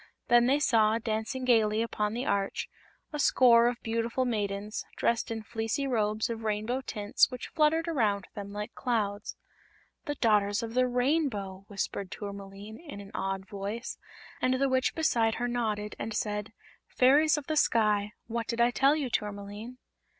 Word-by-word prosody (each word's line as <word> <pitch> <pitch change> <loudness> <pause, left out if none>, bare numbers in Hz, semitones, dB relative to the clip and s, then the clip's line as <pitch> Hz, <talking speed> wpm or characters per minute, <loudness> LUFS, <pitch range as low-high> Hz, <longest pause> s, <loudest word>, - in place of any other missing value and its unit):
Then 240 0 +6
they 275 +2 +4
saw, 225 -6 +3
dancing 225 +3 -3
gaily 220 -3 +3
upon 210 -2 -2
the 245 +3 -2
arch, 200 -4 -1 0.5
a 300 - -3
score 240 -4 +6
of 240 0 -1
beautiful 230 +3 -1
maidens, 210 -2 -2
dressed 235 -1 0
in 225 -1 -4
fleecy 225 +5 -2
robes 215 -4 0
of 230 -1 -5
rainbow 215 +4 -1
tints 210 -4 +2
which 250 -2 -7
fluttered 320 +2 +2
around 215 - 0
them 200 -1 -7
like 210 +1 -5
clouds. 210 -5 -2 0.7
"The 290 -2 -2
Daughters 210 -3 +2
of 225 0 -5
the 255 +1 +3
Rainbow!" 245 -7 0
whispered 195 -1 -3
Tourmaline, 200 +1 -8
in 295 -11 -9
an 200 0 -10
awed 195 0 -3
voice, 205 +3 -5 0.4
and 255 0 +2
the 275 +1 +2
Witch 260 0 +1
beside 230 -9 +2
her 245 - -1
nodded 215 -4 -2
and 220 - -4
said: 210 0 -2 0.4
"Fairies 290 +4 +4
of 295 - -5
the 310 - -2
sky. 210 -6 +2
What 230 0 -3
did 235 - -3
I 240 +1 +4
tell 275 +4 +4
you, 295 -4 -1
Tourmaline?" 205 +4 -4
225 Hz, 165 wpm, -29 LUFS, 210-255 Hz, 0.7 s, Then